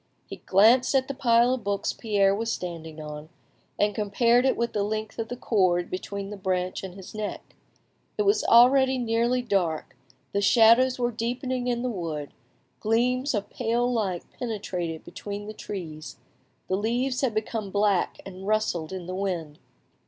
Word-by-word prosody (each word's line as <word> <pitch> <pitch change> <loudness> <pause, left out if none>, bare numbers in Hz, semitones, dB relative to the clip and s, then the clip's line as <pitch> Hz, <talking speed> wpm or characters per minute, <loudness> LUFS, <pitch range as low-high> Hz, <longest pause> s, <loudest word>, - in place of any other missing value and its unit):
He - - -8
glanced 230 +8 +4
at 265 -1 +2
the 275 - -3
pile 240 -1 +3
of 260 - -4
books 200 0 -1
Pierre 200 -3 +2
was 225 +3 -2
standing 165 -5 -6
on, 150 0 -8 0.5
and 205 0 +2
compared 230 +4 +2
it 265 - +2
with 235 0 -1
the 210 - 0
length 215 +2 -3
of 225 - -2
the 245 - -5
cord 185 -7 +1
between 200 +2 -5
the 210 - -6
branch 185 -1 -2
and 185 -2 -7
his 190 -2 -11
neck. 215 -1 -6 0.6
It 420 - +2
was 405 +1 +3
already 260 +2 +6
nearly 240 +1 +1
dark, 180 - -1 0.4
the 200 - 0
shadows 235 +4 +5
were 240 -1 0
deepening 245 +2 -2
in 240 0 -1
the - - 0
wood, 160 -7 -4 0.5
gleams 250 +4 +1
of 205 -1 -3
pale 240 +1 0
light 195 -7 -1 0.2
penetrated 185 -8 -4
between 205 0 -7
the 215 - -7
trees, 165 -8 -7 0.5
the 185 - 0
leaves 245 +5 0
had 250 -5 0
become 215 -1 -2
black 200 -1 +1
and 190 0 -9
rustled 210 -7 0
in 185 -2 -6
the 185 - -5
wind. 175 -6 -3
215 Hz, 165 wpm, -26 LUFS, 190-240 Hz, 0.6 s, already